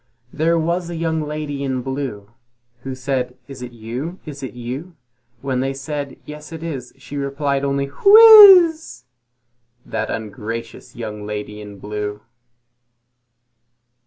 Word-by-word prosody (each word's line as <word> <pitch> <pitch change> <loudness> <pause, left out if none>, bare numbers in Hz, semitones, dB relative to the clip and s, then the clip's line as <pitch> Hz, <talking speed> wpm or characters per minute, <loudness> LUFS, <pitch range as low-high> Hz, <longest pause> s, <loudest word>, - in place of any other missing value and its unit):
There 165 +2 +1
was 170 +2 -1
a 170 - -5
young 160 -1 -1
lady 150 -2 -4
in 130 -2 -2
blue, 130 -6 -5 0.5
Who 130 +1 -6
said, 130 -1 -3
"Is 135 -2 -10
it 125 -1 -7
you? 120 +10 -6
Is 145 -3 -8
it 130 -2 -7
you?" 130 +9 -7 0.5
When 130 -2 -2
they 135 +1 -2
said, 140 0 -5
"Yes, 150 +1 -10
it 165 0 -8
is," 135 -7 -6
she 135 +2 -9
replied 140 0 -2
only, 140 0 0
"Whizz!" 395 - +8 0.8
That 110 -1 -3
ungracious 115 +3 -6
young 105 -3 -7
lady 105 0 -6
in 105 -1 -10
blue. 105 +1 -5
135 Hz, 130 wpm, -20 LUFS, 120-155 Hz, 0.8 s, Whizz